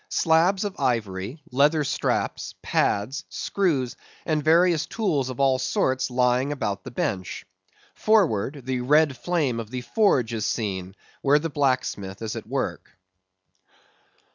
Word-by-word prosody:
Slabs 170 +4 +3
of 205 -1 -5
ivory, 115 +3 -2
leather 145 +4 +3
straps, 135 - -2
pads, 130 +10 0
screws, 150 -11 -1 0.3
and 155 -2 0
various 165 +1 +4
tools 160 - -1
of 130 - -7
all 135 -1 +3
sorts 130 0 0
lying 125 +2 +2
about 105 -9 -3
the - - -7
bench. 95 -6 -3 0.5
Forward, 150 - +1
the 130 -1 -1
red 150 +2 +3
flame 145 -5 -1
of 110 -2 -6
the 125 +1 -4
forge 130 - +2
is 110 -2 -1
seen, 95 -4 -3 0.3
where 145 +1 +4
the 160 +1 -3
blacksmith 130 -8 -1
is 110 - -3
at - - -7
work. - - -4
130 Hz, 135 wpm, -25 LUFS, 115-155 Hz, 0.5 s, various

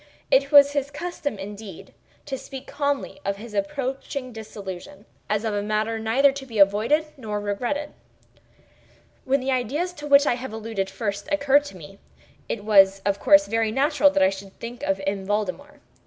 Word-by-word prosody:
It 275 +1 +3
was 285 -1 +8
his 285 -1 -1
custom, 290 -4 -4
indeed, 200 -1 -9 0.3
to 270 - -3
speak 265 0 -9
calmly 285 0 -2
of 200 0 -2
his 220 +1 -10
approaching 260 +4 -3
dissolution, 200 -2 -9 0.2
as 210 +2 0
of 220 - -1
a 205 - 0
matter 215 +2 -1
neither 250 +6 +3
to 270 0 -8
be 225 -3 -7
avoided 215 +10 +4
nor 215 -5 -4
regretted. 240 +9 -3 1.3
When 275 +1 +2
the 265 +1 -1
ideas 275 +9 -1
to 295 -3 -8
which 280 0 +6
I - - +3
have 245 -1 -6
alluded 220 -3 -3
first 200 +3 -4
occurred 285 -1 +3
to 195 - -9
me, 180 +4 -13 0.5
it 205 -2 -4
was 195 -2 +5
of 200 0 +1
course 295 0 +6
very 225 0 0
natural 290 +3 +3
that 290 -5 +2
I 190 - +4
should 195 0 -10
think 235 +1 -7
of 195 0 0
M. 195 0 -2
Valdemar. 215 +9 -3
230 Hz, 175 wpm, -24 LUFS, 205-280 Hz, 1.3 s, was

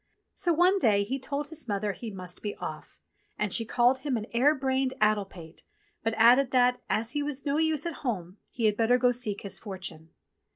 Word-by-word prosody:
So 345 - +1
one 360 +4 +4
day 210 - +3
he 260 +7 -3
told 280 +2 -4
his 320 -4 -4
mother 205 -1 -1
he 225 +4 -7
must 185 -3 -6
be 205 - -4
off, - - -8 0.4
and 210 -2 -1
she 230 - +1
called 245 +3 +3
him 265 -2 -1
an 215 - -4
air 275 +6 +4
brained 265 -1 0
addle 215 -1 +3
pate, 170 -4 -12 0.4
but 225 +1 -1
added 245 +4 +6
that, 250 -1 +3
as 230 +2 0
he 295 - -1
was 290 -1 -4
no 285 0 +1
use 315 -1 +1
at 340 -3 -4
home, 190 - -3
he 235 - -2
had 210 -1 +3
better 230 +3 +3
go 250 0 +3
seek 225 -4 -3
his 200 - -6
fortune. 185 -6 -8
240 Hz, 210 wpm, -28 LUFS, 210-275 Hz, 0.4 s, added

